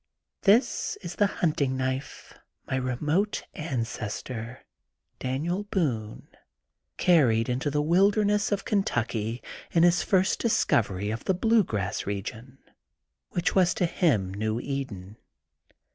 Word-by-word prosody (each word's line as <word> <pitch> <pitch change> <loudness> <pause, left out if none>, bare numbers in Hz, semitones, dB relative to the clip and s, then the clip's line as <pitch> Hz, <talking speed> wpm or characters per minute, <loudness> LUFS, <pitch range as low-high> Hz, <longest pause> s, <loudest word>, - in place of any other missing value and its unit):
This 245 - +3
is - - -6
the 205 - +4
hunting 145 -8 0
knife 130 +2 -4 0.3
my - - -2
remote 150 - 0
an 135 -7 -2
cestor, 115 +3 -6 0.6
Daniel 160 +10 -2
Boone, 125 - -2 0.7
carried 120 -10 +4
into 130 +4 -1
the 150 +1 0
wilder 195 +6 +3
ness 205 +1 +1
of 205 - -1
Kentucky 120 - -1 0.3
in 165 - +3
his 175 0 +4
first 190 -1 +2
discovery 105 - +1
of 110 - -5
the 190 - +2
blue 225 +3 +3
grass 100 - -3
region 110 +6 -5 0.8
that 175 - 0
was 185 -2 +3
to 180 - +1
him 120 - +1
new 110 +3 -1
Eden. 115 -8 -5
135 Hz, 125 wpm, -27 LUFS, 115-185 Hz, 0.8 s, the